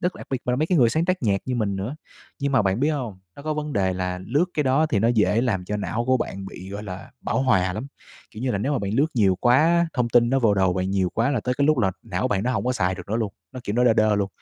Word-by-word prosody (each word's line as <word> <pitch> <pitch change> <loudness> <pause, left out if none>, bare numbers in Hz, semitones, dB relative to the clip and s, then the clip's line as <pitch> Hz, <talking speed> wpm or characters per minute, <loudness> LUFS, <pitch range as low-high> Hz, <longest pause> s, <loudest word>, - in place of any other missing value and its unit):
Rất 180 +1 -1
đặc - - -10
biệt 135 - 0
mà 125 - 0
là - - +1
mấy 155 +4 +1
cái 180 -1 +2
người 120 -3 +5
sáng 160 +7 +1
tác 185 -1 -1
nhạc 100 -4 +1
như 130 - -1
mình 105 -5 -1
nữa. 100 +8 -4 0.4
Nhưng 140 -1 -1
mà 130 - +4
bạn 95 +3 0
biết 145 - +2
hông, 125 -10 -4 0.2
nó - - -10
có 155 +1 -2
vấn 150 0 -4
đề 95 -4 +1
là 90 0 -3
lướt 145 +8 +2
cái 150 - +1
đó 135 +3 +2
thì 115 - 0
nó 115 +3 +2
dễ 110 -1 +3
làm 110 -7 -1
cho 105 +3 -3
não 105 +4 -2
của 130 +1 +3
bạn 95 -5 -4
bị, 95 0 -9
gọi 100 +1 -6
là, 95 -2 -8
bão 130 - -1
hòa 95 -8 +2
lắm. 110 +8 -5 0.4
Kiểu 110 +2 -9
như 130 - 0
là, 100 - -1
nếu 135 +9 -1
mà 140 - +1
bạn 100 0 -3
lướt 140 +6 +3
nhiều 100 -6 +3
quá 120 +1 +5
á, 170 +3 +4
thông 125 -3 +1
tin 120 0 +4
nó 135 - +3
vô 110 -5 +3
đầu 95 -2 +2
bạn 95 +1 -2
nhiều 95 -2 +1
quá 115 +4 +1
là 130 -5 0
tới 125 +3 -1
cái 140 - +3
lúc 155 -3 +3
là 95 -4 +2
não 95 -5 -2
bạn 100 -1 0
nó 125 - 0
hông - - -1
có 125 - +1
xài 95 -6 0
được 90 0 -10
nữa 110 - 0
luôn. 110 -4 -2 0.2
Nó 130 - -7
kiểu 105 - -2
nó 125 - +3
đơ 115 - +5
đơ 110 -1 +3
luôn. 100 -1 0
115 Hz, 330 wpm, -24 LUFS, 100-130 Hz, 0.4 s, người